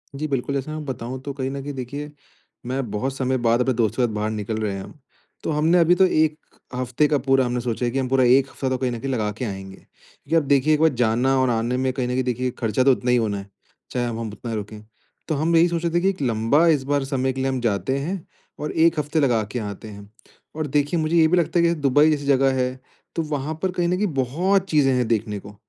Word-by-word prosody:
जी, 155 Hz, +2 st, -3 dB
बिल्कुल। 140 Hz, -1 st, -2 dB
जैसे 140 Hz, +3 st, -3 dB
मैं 155 Hz, 0 st, -5 dB
बताऊँ 130 Hz, -1 st, -5 dB
तो 140 Hz, 0 st, -5 dB
कहीं 135 Hz, -1 st, -3 dB
न 140 Hz, 0 st, -5 dB
कहीं 145 Hz, +1 st, -5 dB
देखिए, 140 Hz, +3 st, -6 dB, 0.5 s
मैं 130 Hz, -1 st, -3 dB
बहुत 130 Hz, +6 st, -2 dB
समय 130 Hz, 0 st, 0 dB
बाद 120 Hz, 0 st, +2 dB
अपने 130 Hz, +1 st, +1 dB
दोस्तों 115 Hz, +1 st, +1 dB
के -, -, +3 dB
साथ 110 Hz, -, -6 dB
बाहर 105 Hz, +1 st, -1 dB
निकल 110 Hz, +1 st, -3 dB
रहे 105 Hz, -2 st, -1 dB
हैं 95 Hz, -, -5 dB
हम। 150 Hz, -, -13 dB, 0.4 s
तो -, -, -1 dB
हमने 155 Hz, +4 st, +3 dB
अभी 170 Hz, +1 st, +5 dB
तो 190 Hz, -, +5 dB
1 155 Hz, -3 st, +2 dB, 0.4 s
हफ़्ते 130 Hz, +4 st, +1 dB
का 150 Hz, -, +2 dB
पूरा 135 Hz, 0 st, +2 dB
हमने 125 Hz, 0 st, -1 dB
सोचा 120 Hz, 0 st, -2 dB
है 120 Hz, -, 0 dB
कि, 135 Hz, -, -1 dB
हम 130 Hz, -, -1 dB
पूरा 130 Hz, -1 st, +3 dB
1 130 Hz, +2 st, +4 dB
हफ्ता 135 Hz, -, -3 dB
तो 130 Hz, -, 0 dB
कहीं 125 Hz, -1 st, -1 dB
न 120 Hz, -, -4 dB
कहीं 135 Hz, +3 st, -3 dB
लगा 110 Hz, -5 st, -1 dB
के 125 Hz, -, -3 dB
आएँगे। 95 Hz, -2 st, -6 dB
क्योंकि 160 Hz, -, -8 dB
अब 160 Hz, -, +4 dB
देखिए, 140 Hz, +2 st, +3 dB
1 150 Hz, -, +2 dB
बार 160 Hz, -, +6 dB
जाना 125 Hz, +4 st, +2 dB
और 130 Hz, -, +2 dB
आने 120 Hz, +2 st, 0 dB
में 130 Hz, 0 st, 0 dB
कहीं 130 Hz, -2 st, -2 dB
न -, -, -2 dB
कहीं 130 Hz, +1 st, 0 dB
देखिए 125 Hz, 0 st, -1 dB
ख़र्चा 115 Hz, +1 st, +1 dB
तो 135 Hz, -, +6 dB
उतना 125 Hz, -1 st, 0 dB
ही 125 Hz, -, +4 dB
होना 105 Hz, -4 st, 0 dB
है, 100 Hz, 0 st, -9 dB, 0.4 s
चाहे 120 Hz, -1 st, -1 dB
हम 115 Hz, -1 st, -4 dB
अब 105 Hz, -, -8 dB
उतना 115 Hz, +1 st, -6 dB
रुकें। 105 Hz, 0 st, -6 dB, 0.5 s
तो 155 Hz, -, 0 dB
हम 160 Hz, +4 st, +1 dB
यही 165 Hz, +1 st, +6 dB
सोच 170 Hz, -1 st, -2 dB
रहे 170 Hz, -1 st, -1 dB
थे 175 Hz, -, +3 dB
कि 195 Hz, -, +3 dB
एक 185 Hz, -6 st, -4 dB
लंबा, 120 Hz, +6 st, +2 dB
इस 150 Hz, -5 st, +3 dB
बार 140 Hz, +1 st, 0 dB
समय 130 Hz, -1 st, -1 dB
के 130 Hz, -, -4 dB
लिए 135 Hz, -, 0 dB
हम 130 Hz, -1 st, -1 dB
जाते 115 Hz, +4 st, 0 dB
हैं 170 Hz, +5 st, -4 dB, 0.3 s
और 150 Hz, -, -3 dB
1 160 Hz, 0 st, +3 dB
हफ़्ते 150 Hz, +2 st, -1 dB
लगा 120 Hz, -7 st, +2 dB
के 120 Hz, -, -2 dB
आते 105 Hz, 0 st, -6 dB
हैं। 100 Hz, -1 st, -11 dB, 0.5 s
और 155 Hz, -1 st, -2 dB
देखिए 145 Hz, +4 st, +1 dB
मुझे 155 Hz, +2 st, 0 dB
ये 160 Hz, -1 st, +6 dB
भी 180 Hz, +3 st, +2 dB
लगता 170 Hz, +1 st, +1 dB
है 170 Hz, -, +4 dB
कि 170 Hz, -, +3 dB
दुबई 145 Hz, +3 st, +4 dB
जैसी 145 Hz, -2 st, -1 dB
जगह 135 Hz, -1 st, +3 dB
है, 125 Hz, +1 st, -2 dB, 0.4 s
तो 165 Hz, -, 0 dB
वहाँ 150 Hz, 0 st, -3 dB
पर 190 Hz, -1 st, 0 dB
कहीं 175 Hz, -1 st, 0 dB
न 180 Hz, -, +1 dB
कहीं 210 Hz, +2 st, +1 dB
बहुत 175 Hz, +10 st, +1 dB
चीज़ें 140 Hz, -4 st, +3 dB
हैं 125 Hz, -2 st, +1 dB
देखने 105 Hz, -2 st, -1 dB
को। 100 Hz, +1 st, -12 dB
130 Hz, 275 wpm, -23 LUFS, 120-150 Hz, 0.5 s, बार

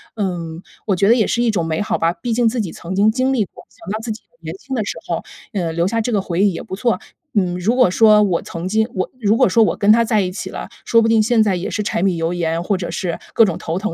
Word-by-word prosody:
嗯， 175 Hz, -5 st, -3 dB, 0.2 s
我 200 Hz, -4 st, +1 dB
觉 195 Hz, -, +3 dB
得 235 Hz, -, +6 dB
也 220 Hz, -4 st, +2 dB
是 240 Hz, -, 0 dB
一 240 Hz, -, +2 dB
种 175 Hz, -6 st, -1 dB
美 160 Hz, +2 st, -1 dB
好 210 Hz, -, -1 dB
吧， 165 Hz, +1 st, +1 dB
毕 225 Hz, +7 st, -3 dB
竟 235 Hz, 0 st, +2 dB
自 240 Hz, +1 st, -3 dB
己 180 Hz, -, -4 dB
曾 175 Hz, +2 st, -7 dB
经 205 Hz, +2 st, +4 dB
经 255 Hz, +3 st, 0 dB
历 220 Hz, -6 st, +1 dB
过， -, -, -16 dB
想 -, -, -13 dB
到 215 Hz, -, -2 dB
自 225 Hz, -1 st, -4 dB
己 215 Hz, -, -7 dB, 0.2 s
年 -, -, -6 dB
轻 270 Hz, -9 st, -6 dB
的 220 Hz, -, 0 dB
时 -, -, -5 dB
候， -, -, -2 dB, 0.3 s
呃 175 Hz, -5 st, -1 dB
留 170 Hz, +2 st, +1 dB
下 230 Hz, +2 st, 0 dB
这 240 Hz, +2 st, -2 dB
个 205 Hz, -3 st, +1 dB
回 175 Hz, 0 st, -2 dB
忆 205 Hz, -, +4 dB
也 -, -, -5 dB
不 -, -, -6 dB
错。 225 Hz, -2 st, 0 dB, 0.3 s
嗯， 180 Hz, -4 st, +1 dB
如 220 Hz, +7 st, +1 dB
果 250 Hz, -7 st, +5 dB
说 210 Hz, +2 st, +5 dB
我 180 Hz, -4 st, +1 dB
曾 170 Hz, +2 st, -6 dB
经 220 Hz, +3 st, +2 dB
我 185 Hz, -, -2 dB
如 215 Hz, +2 st, +3 dB
果 -, -, +5 dB
说 225 Hz, +4 st, +4 dB
我 -, -, 0 dB
跟 200 Hz, -, +1 dB
他 230 Hz, +1 st, +4 dB
在 220 Hz, -2 st, +1 dB
一 185 Hz, -, -2 dB
起 185 Hz, -, -6 dB
了， -, -, -6 dB, 0.2 s
说 230 Hz, -, +4 dB
不 225 Hz, -, +2 dB
定 225 Hz, -1 st, +4 dB
现 225 Hz, 0 st, +3 dB
在 205 Hz, -3 st, +2 dB
也 180 Hz, -, -3 dB
是 215 Hz, -, -2 dB
柴 205 Hz, -4 st, -1 dB
米 190 Hz, -3 st, +1 dB
油 165 Hz, +1 st, -1 dB
盐， 165 Hz, -1 st, -1 dB
或 200 Hz, +3 st, 0 dB
者 180 Hz, -2 st, -4 dB
是 175 Hz, -3 st, -3 dB, 0.2 s
各 225 Hz, -, +6 dB
种 185 Hz, -, -2 dB
头 165 Hz, +3 st, -3 dB
疼， 210 Hz, -3 st, -3 dB
205 Hz, 325 characters per minute, -19 LUFS, 175-225 Hz, 0.3 s, 得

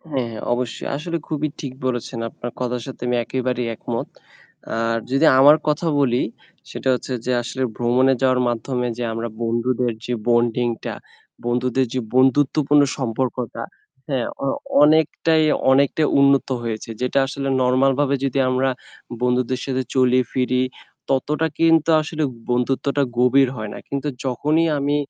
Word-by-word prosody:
আ -, -, -38 dB
হ্যাঁ, 130 Hz, -3 st, 0 dB
হ্যাঁ। 110 Hz, -, -7 dB
অবশ্যই 120 Hz, -1 st, -3 dB
আসলে 170 Hz, +3 st, -3 dB
খুবই 155 Hz, -1 st, -1 dB
ঠিক 135 Hz, -3 st, -5 dB
বলেছেন। 120 Hz, -1 st, -3 dB
আপনার 120 Hz, -, -7 dB
কথার 125 Hz, -1 st, -2 dB
সাথে 130 Hz, -, -9 dB
আমি 125 Hz, -, +1 dB
একেবারেই 125 Hz, 0 st, -2 dB
একমত। -, -, -4 dB, 0.7 s
আর 115 Hz, 0 st, 0 dB
যদি 135 Hz, +4 st, +3 dB
আমার 145 Hz, +3 st, +8 dB
কথা 150 Hz, +3 st, 0 dB
বলি 125 Hz, -3 st, +2 dB, 0.5 s
সেটা -, -, -4 dB
হচ্ছে 125 Hz, -, -5 dB
যে 125 Hz, -, +1 dB
আসলে 125 Hz, +2 st, -4 dB
ভ্রমণে 125 Hz, +2 st, +3 dB
যাওয়ার 130 Hz, -1 st, +3 dB
মাধ্যমে 125 Hz, +1 st, -2 dB
যে 120 Hz, -, -2 dB
আমরা 115 Hz, +1 st, -3 dB
বন্ধুদের 120 Hz, +1 st, 0 dB
যে 125 Hz, -, -1 dB
বন্ডিং 120 Hz, 0 st, +2 dB, 0.2 s
টা, -, -, -3 dB, 0.5 s
বন্ধুদের 125 Hz, +2 st, +1 dB
যে 130 Hz, -, 0 dB
বন্ধুত্বপূর্ণ 145 Hz, +2 st, +4 dB, 0.2 s
সম্পর্কটা। 125 Hz, -1 st, -3 dB, 0.5 s
হ্যাঁ 130 Hz, -4 st, -1 dB, 0.2 s
অ -, -, 0 dB, 0.4 s
অনেকটাই, 155 Hz, +1 st, +3 dB, 0.3 s
অনেকটাই 140 Hz, +3 st, +3 dB
উন্নত 140 Hz, 0 st, +4 dB
হয়েছে। 115 Hz, -1 st, -4 dB
যেটা 125 Hz, +2 st, +1 dB
আসলে 135 Hz, 0 st, -4 dB
নরমাল 130 Hz, +2 st, +3 dB
ভাবে 140 Hz, -1 st, +2 dB
যদি 135 Hz, 0 st, 0 dB
আমরা 130 Hz, +1 st, +1 dB, 0.5 s
বন্ধুদের 125 Hz, +1 st, +1 dB
সাথে 130 Hz, -1 st, -1 dB
চলি 130 Hz, -1 st, +4 dB
ফিরি, 125 Hz, 0 st, +1 dB, 0.5 s
ততটা 150 Hz, +4 st, 0 dB
কিন্তু 165 Hz, -1 st, +4 dB
আসলে 155 Hz, 0 st, -4 dB, 0.3 s
বন্ধুত্বটা 135 Hz, +3 st, 0 dB, 0.2 s
গভীর 130 Hz, +2 st, +4 dB
হয় 110 Hz, -2 st, -5 dB
না। -, -, -7 dB
কিন্তু 140 Hz, +1 st, -3 dB, 0.2 s
যখনই 150 Hz, +6 st, +1 dB
আমি 145 Hz, +1 st, +1 dB
130 Hz, 150 wpm, -21 LUFS, 125-140 Hz, 0.7 s, আমার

